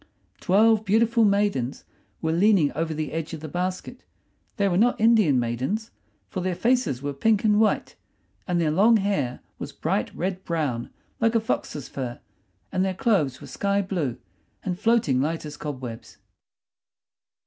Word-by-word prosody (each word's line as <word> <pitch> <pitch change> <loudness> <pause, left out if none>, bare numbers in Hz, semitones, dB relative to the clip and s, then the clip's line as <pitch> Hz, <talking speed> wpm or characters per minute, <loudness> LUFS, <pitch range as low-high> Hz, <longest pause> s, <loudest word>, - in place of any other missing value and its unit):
Twelve 220 +3 +4
beautiful 225 +3 +3
maidens 200 - 0 0.4
were 160 - +1
leaning 175 -3 +4
over 160 +2 -2
the 155 -2 -3
edge 165 +1 -4
of - - -9
the 155 - -7
basket. 185 - -4 0.5
They 200 -2 +2
were 180 - +1
not 235 +6 +3
Indian 215 - +4
maidens, 130 - -2 0.4
for 190 - -5
their 180 0 -1
faces 235 - +1
were 145 0 -2
pink 210 +8 +2
and 210 -1 +4
white, 220 -1 +1 0.5
and 175 -2 +1
their 160 -3 +1
long 215 +8 +5
hair 190 - -1 0.2
was - - -6
bright - - -1
red 185 +1 -3
brown 145 -8 -2 0.3
like 230 0 +2
a - - +5
fox's 150 - -3
fur, 125 -3 -5 0.5
and 185 -1 +1
their 190 -1 -1
clothes 180 - +1
were - - -9
sky 200 0 0
blue 170 - -2 0.5
and 180 -1 -3
floating 215 - +2
light 160 +3 -2
as 150 -1 -7
cobwebs. 125 -6 -7
180 Hz, 160 wpm, -25 LUFS, 145-210 Hz, 0.5 s, long